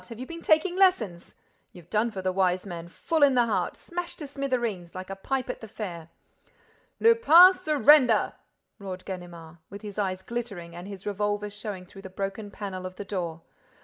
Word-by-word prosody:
Have 230 -1 -9
you 255 - -5
been 335 +4 -8
taking 325 +4 +3
lessons? 235 - +2 0.4
You've 175 -2 -15
done 220 +2 +2
for 195 -4 -6
the 185 - +1
Wise 185 0 +1
Man! 170 -3 -7
Full 320 - -2
in 280 -2 +6
the 240 -1 +4
heart! 230 - -1
Smashed 350 0 -6
to 300 - -6
smithereens, 240 -11 -3
like 185 +1 -6
a - - -4
pipe 255 +6 -2
at - - -5
the 220 - -8
fair!—" 175 -6 -7 0.9
"Lupin, 380 -6 +8
surrender!" 295 - +4 0.5
roared 185 -2 -7
Ganimard, 175 -3 -8
with 200 +2 -10
his 210 -1 -6
eyes 190 -2 -2
glittering 200 -8 -5
and 175 +2 -8
his 195 -2 -9
revolver 205 0 -1
showing 205 -3 -6
through 195 +2 -13
the 190 - -9
broken 195 +2 -5
panel 190 -3 -6
of 185 - -11
the 205 - -7
door. 170 -4 -4
205 Hz, 185 wpm, -27 LUFS, 185-255 Hz, 0.9 s, Lupin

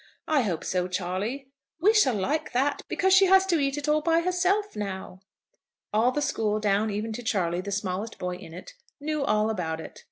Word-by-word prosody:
"I 305 -3 +3
hope 185 -9 -2
so, 180 -1 -1
Charley." 200 +9 -3 0.3
"We 410 +6 +4
shall 275 - +4
like 275 +12 -1
that, 275 +3 +1
because 380 0 +2
she 385 0 +7
has 380 0 +6
to 345 -4 +2
eat 275 0 0
it 290 +1 -4
all 305 0 +3
by 330 +1 +2
herself 365 +4 0
now." 190 -2 -5 0.7
All 225 +4 +3
the 295 +3 -1
school, 220 -6 0
down 210 +1 +1
even 215 +2 -3
to 240 - -5
Charley, 180 -6 0
the 200 +2 -6
smallest 200 +2 -3
boy 180 0 -4
in 165 - -12
it, 180 +3 -10 0.3
knew 305 0 -2
all 215 -2 +2
about 165 -6 -3
it. - - -9
Mr. - - -12
225 Hz, 210 wpm, -26 LUFS, 190-305 Hz, 0.7 s, she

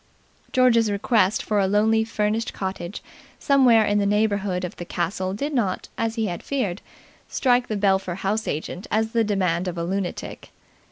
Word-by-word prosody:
George's 235 -4 +4
request 205 0 +1
for 210 -1 0
a 195 - +2
lonely 220 +3 +3
furnished 220 0 -1
cottage 190 -1 -5 0.3
somewhere 250 -6 +4
in 205 0 +2
the 200 - +1
neighbourhood 205 -3 0
of 175 - -7
the - - -5
castle 185 +2 -2
did 290 +8 -3
not, 205 -8 -1
as 225 0 -2
he 225 -2 0
had 175 -4 -4
feared, 215 -10 -2 0.5
strike 245 -1 +2
the 215 - -2
Belpher 190 -3 +1
house 205 +4 -2
agent 160 +5 -4
as 220 +1 0
the 230 -1 +2
demand 185 -4 0
of 175 -1 -4
a 170 - -2
lunatic. 185 +1 -4
205 Hz, 170 wpm, -23 LUFS, 185-225 Hz, 0.5 s, George's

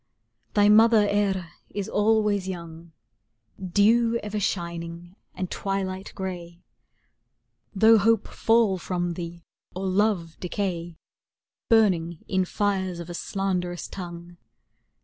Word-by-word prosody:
Thy 205 0 +5
mother 215 0 +6
Eire 195 -4 0 0.2
is 200 -1 -4
always 210 -2 +2
young, 170 -2 -8 0.7
Dew 225 +5 +3
ever 210 0 -3
shining 170 -2 -4 0.2
and 185 -1 -4
twilight 195 -1 -3
gray; 175 -2 -6 1.1
Though 220 +3 +6
hope 225 +1 +2
fall 225 -4 +2
from 175 -1 -2
thee 170 0 -7 0.3
or 190 +1 -3
love 185 -4 0
decay 175 -3 -3 0.7
Burning 175 -8 +2
in 185 -1 +1
fires 190 -2 -1
of 170 0 -7
a - - -5
slanderous 180 -1 -2
tongue. 175 -1 -9
190 Hz, 110 wpm, -25 LUFS, 175-205 Hz, 1.1 s, mother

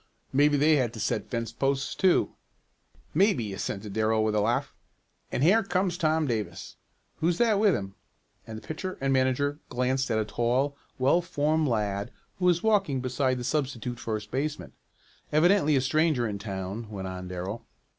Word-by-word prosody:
"Maybe 145 +2 +4
they 150 +2 +4
had 120 -4 0
to 115 - -8
set 105 - -2
fence 115 -2 -3
posts 135 0 -1
too." 190 -2 +2 0.8
"Maybe," 150 - +2
assented 100 +1 -4
Darrell 110 0 +2
with 110 -1 +1
a 105 - +2
laugh. 115 +3 0 0.6
"And 130 - 0
here 200 +8 +5
comes 185 -3 0
Tom 160 -2 +1
Davis. 115 -6 -4 0.4
Who's 170 +1 +1
that 220 -2 +3
with 205 -4 +4
him?" 95 -1 -5 0.5
and 110 -1 -6
the - - -11
pitcher 185 +4 -5
and 135 0 +1
manager 135 +3 +1
glanced 130 +1 0
at 110 - +1
a 110 - 0
tall, 125 +6 0 0.2
well 135 +7 +3
formed 155 -2 0
lad 105 -3 -1 0.3
who 180 - 0
was 175 -1 +3
walking 200 -11 +2
beside 130 0 0
the 125 - -5
substitute 125 -3 -2
first 110 -2 -4
baseman. 145 +4 -3 0.6
"Evidently 155 0 +4
a 135 - +3
stranger 150 -3 +2
in 100 -2 -4
town," 100 +2 -5
went 95 -3 -5
on 90 0 -6
Darrell. 95 +6 -5
130 Hz, 170 wpm, -27 LUFS, 110-155 Hz, 0.8 s, here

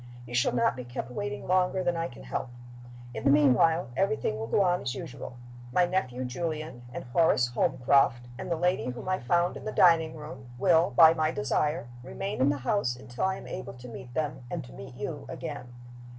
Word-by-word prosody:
You 120 - -10
shall 125 0 +3
not 125 - +2
be 125 - -6
kept 120 0 -6
waiting 105 -3 -4
longer 185 0 +2
than 175 -1 +1
I 165 0 -1
can 120 - -12
help. 125 - -4 0.6
In 110 - -5
the - - +4
meanwhile 145 +2 +4
everything 135 - 0
will 110 - -4
go 195 - +3
on 180 -1 +2
as 125 +1 -3
usual. 130 -1 -7 0.3
My 180 +6 +4
nephew 130 -9 -1
Julian, 155 0 -4
and - - -6
Horace 120 -2 +3
Holmcroft, 125 -1 +2
and 125 - -6
the 170 - +1
lady 175 -4 0
whom 125 +7 -7
I 185 0 +1
found 175 +8 +1
in - - -10
the 215 - -2
dining 165 -4 +4
room, 135 -5 -9
will, 165 +3 +4
by 160 -1 +7
my 155 -1 +1
desire, 155 - 0
remain 195 +6 -4
in 135 - +5
the 145 - 0
house 130 - 0
until 125 +4 -4
I 190 0 +1
am - - -10
able - - -6
to 125 0 -11
meet 125 0 -9
them, 150 -4 -2
and - - -4
to - - -13
meet - - -10
you, - - -5
again." 125 - -6
140 Hz, 210 wpm, -28 LUFS, 125-170 Hz, 0.6 s, by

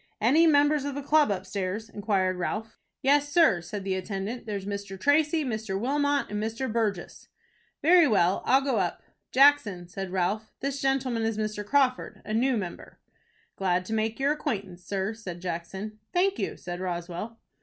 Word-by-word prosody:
"Any 295 +10 +5
members 290 -1 +4
of 285 -1 -4
the 285 - -4
club 300 -1 +4
upstairs?" 195 +2 -3
inquired 195 -4 0
Ralph. 215 +5 -4 0.2
"Yes, 290 +2 +3
sir," 315 - +4
said 195 +4 -6
the 190 0 -1
attendant. 195 +5 -4
"There's 200 -2 -4
Mr. 200 -1 -5
Tracy, 300 +3 +2
Mr. 215 -5 -3
Wilmot, 285 +3 +1
and 210 0 -2
Mr. 225 +2 -3
Burgess." 210 -6 -2 0.6
"Very 340 0 +6
well, 190 -5 +2
I'll 265 +1 +4
go 270 -4 0
up." 175 -3 -2 0.3
"Jackson," 255 -10 +4
said 195 +1 -6
Ralph, 190 +4 -1
"this 275 +1 -3
gentleman 265 -3 0
is 225 -1 -1
Mr. 215 -1 -2
Crawford, 255 +3 +1
a 215 - -4
new 250 +2 +2
member." 185 -5 -7 0.6
"Glad 185 -1 0
to 225 - -4
make 220 +1 -1
your 275 +2 +2
acquaintance, 200 -12 -3
sir," 195 +3 -2
said 190 -6 -8
Jackson. 185 +5 -5
"Thank 380 +2 +1
you," - - -3
said 175 0 -6
Roswell. 180 +4 -5
215 Hz, 165 wpm, -27 LUFS, 190-275 Hz, 0.6 s, Very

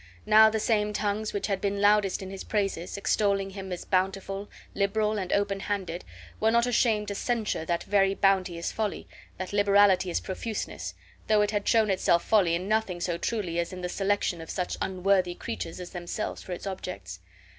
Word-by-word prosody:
Now 220 +1 +7
the 220 0 -1
same 210 -1 +1
tongues 210 +1 -1
which 205 - -2
had 195 -2 -1
been 200 0 -1
loudest 205 -2 +3
in 190 - -7
his 195 - -6
praises, 195 -4 -2
extolling 200 -1 +1
him 190 -1 -7
as 180 - -5
bountiful, 195 +1 -1 0.2
liberal, 210 +1 +1
and 185 -2 -4
open 200 -1 +1
handed, 190 -4 -3 0.4
were 220 - +3
not 235 +1 +3
ashamed 225 -4 +2
to - - -2
censure 220 -6 -1
that 170 +1 -1
very 195 -1 +2
bounty 190 -3 +2
as 170 - -3
folly, 215 -2 -3 0.3
that 185 +1 -5
liberality 200 -2 +4
as 170 - 0
profuseness, 215 +3 -5 0.3
though 210 -1 +4
it 205 - 0
had 205 -1 -2
shown 220 -3 +4
itself 170 -2 +2
folly 185 -6 +3
in 180 +3 -3
nothing 215 -4 0
so 175 -1 -2
truly 185 -7 -2
as 170 - -2
in 185 -1 -7
the 180 - -3
selection 195 -3 0
of 160 - -10
such 180 -1 -2
unworthy 185 -1 +1
creatures 165 0 -5
as 180 - -7
themselves 175 +3 -4
for - - -10
its 175 - -5
objects. 95 - -6
195 Hz, 190 wpm, -28 LUFS, 180-210 Hz, 0.4 s, Now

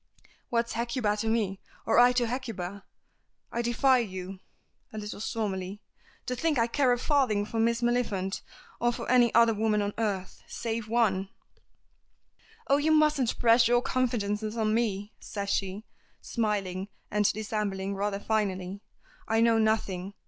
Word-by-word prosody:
"'What's 235 0 0
Hecuba 235 -2 0
to 220 +1 -2
me, 210 -4 0 0.2
or 225 - +4
I 245 0 +7
to 245 -1 +2
Hecuba?' 220 -6 -5 0.7
I 235 - -1
defy 250 +2 +3
you," 190 -3 -5 0.5
a 215 - -8
little 210 -1 -6
stormily, 200 -3 -3 0.5
"to 250 - -2
think 305 +3 0
I 230 - +4
care 255 +2 +2
a 245 - +3
farthing 245 -7 +1
for 225 +2 -4
Miss 235 +1 +1
Maliphant 215 -6 0 0.4
or 240 0 +2
for - - -6
any 245 -2 +5
other 230 0 +6
woman 215 0 +1
on 205 0 -1
earth 195 -4 -2
save 230 -1 -4
one!" 200 -5 +1 1.4
"Oh, 280 - +4
you 300 +2 +2
mustn't 305 -5 +3
press 230 0 +5
your 240 +1 +3
confidences 220 -4 -1
on 215 -1 +1
me," 210 -3 -1
says 200 -1 -4
she, 195 +2 -2 0.3
smiling 200 -4 -2 0.2
and 210 -1 +3
dissembling 205 -2 -3
rather 200 0 -2
finely; 200 -3 -2 0.5
"I 225 0 +2
know 230 0 +4
nothing. 205 -3 0
220 Hz, 150 wpm, -28 LUFS, 200-240 Hz, 1.4 s, I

